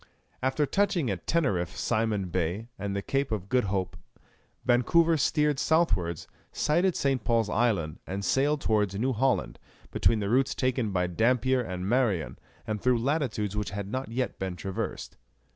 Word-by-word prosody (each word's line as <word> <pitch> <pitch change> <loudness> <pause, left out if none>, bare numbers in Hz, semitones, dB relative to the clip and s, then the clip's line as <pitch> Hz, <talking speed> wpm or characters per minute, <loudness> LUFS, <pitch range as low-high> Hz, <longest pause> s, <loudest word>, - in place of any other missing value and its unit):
After 135 +3 +1
touching 175 - +1
at 90 -3 -6
Teneriffe, 100 - 0
Simon 110 -5 0
Bay, 90 +6 -2
and 100 0 -3
the 100 - -2
Cape 135 -2 -1
of 100 -3 -3
Good 125 -3 +2
Hope, 95 -1 -2 0.7
Vancouver 160 +7 +4
steered 150 -2 +1
south 160 - +3
wards, 85 -2 -5 0.2
sighted 175 +4 +1
St. 135 -4 0
Paul's 115 -3 +1
Island, 100 -10 0
and 100 +2 -4
sailed 145 +2 +2
towards 105 -3 +1
New 130 +6 0
Holland, 130 +2 0 0.3
between 115 - +2
the 100 - -2
routes 130 +1 +2
taken 130 -3 0
by 90 -2 0
Dampier 125 +7 +2
and 95 -4 -4
Marion, 110 -8 0 0.3
and 105 -2 -3
through 125 -1 +3
latitudes 115 -6 -1
which 105 -1 -2
had 100 0 -5
not 130 -1 -3
yet 125 +2 -3
been 95 -2 -3
traversed. 95 +1 -5
115 Hz, 160 wpm, -28 LUFS, 100-135 Hz, 0.7 s, Vancouver